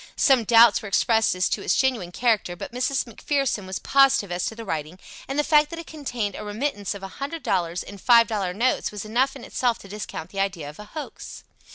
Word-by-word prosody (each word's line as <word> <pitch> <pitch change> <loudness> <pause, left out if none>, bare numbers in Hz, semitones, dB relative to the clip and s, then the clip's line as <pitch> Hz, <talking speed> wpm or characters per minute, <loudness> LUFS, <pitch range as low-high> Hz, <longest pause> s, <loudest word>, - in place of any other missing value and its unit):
Some 260 -5 +4
doubts 230 0 +6
were 215 - -7
expressed 220 +1 +2
as 185 0 +1
to - - -1
its - - +1
genuine 245 -10 0
character 215 -4 0
but 260 +10 -8
Mrs. 255 +3 0
McPherson 250 -3 -2
was 190 - -3
positive 275 -7 +3
as 175 0 -1
to 225 - -5
the 230 0 -8
writing, 160 -1 -4 0.3
and 270 - -4
the 295 - +3
fact 300 0 +4
that 335 - -7
it 335 - -7
contained 245 -10 -4
a - - -6
remittance 210 -1 -3
of 195 - -9
a - - -4
hundred 290 +2 -4
dollars 175 -4 -1
in 200 0 -11
five 235 +2 +6
dollar 205 -5 -2
notes 235 +8 0
was 210 0 -6
enough 255 +5 +1
in 265 - -10
itself 245 -3 0
to - - -13
discount 195 -4 -7
the 195 - -5
idea 190 -6 -2
of 150 +5 -11
a 210 - -8
hoax. 300 +7 -8
225 Hz, 230 wpm, -24 LUFS, 195-265 Hz, 0.3 s, doubts